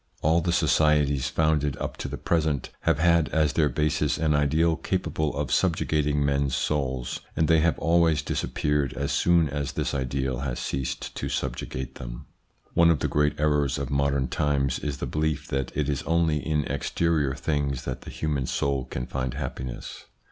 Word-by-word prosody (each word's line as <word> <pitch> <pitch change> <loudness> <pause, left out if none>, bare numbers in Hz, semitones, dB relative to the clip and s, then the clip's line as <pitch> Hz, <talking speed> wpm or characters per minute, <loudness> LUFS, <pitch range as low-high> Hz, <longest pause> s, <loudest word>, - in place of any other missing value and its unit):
All 80 +2 +4
the 85 +1 0
societies 75 -4 +3
founded 75 -3 +1
up - - -4
to - - -4
the - - -5
present 80 -5 0 0.2
have - - +3
had 85 0 +3
as 80 -2 +2
their 75 -2 +3
basis 75 +4 0
an 80 -1 +1
ideal 75 +3 +2
capable 80 -4 -2
of 75 -1 -2
subjugating 75 -5 +1
men's 70 -2 +1
souls, 65 -4 -1 0.2
and 80 - +2
they 80 -1 +5
have 85 +1 +2
always 80 -2 +3
disappeared 75 -3 -1
as 70 +1 -2
soon 85 -2 +3
as 70 0 -3
this - - -2
ideal 65 -1 -1
has 65 -3 -3
ceased 65 -1 -3
to - - -3
subjugate 65 0 -3
them. - - -7 0.5
One 85 0 +5
of 85 - +4
the - - -1
great 75 0 +1
errors 75 -2 +2
of 70 -3 -4
modern 70 -1 +1
times 70 -3 0
is 75 -3 -3
the - - -3
belief 75 -1 -1
that 65 -2 -2
it 75 -2 +1
is 70 -3 -1
only 80 -2 +1
in 75 -2 0
exterior 70 0 0
things 70 -2 -1
that - - -4
the - - -10
human 75 -4 -2
soul 70 -2 0
can 60 - -4
find 65 -1 -3
happiness. 65 -3 -6
75 Hz, 175 wpm, -26 LUFS, 70-80 Hz, 0.5 s, they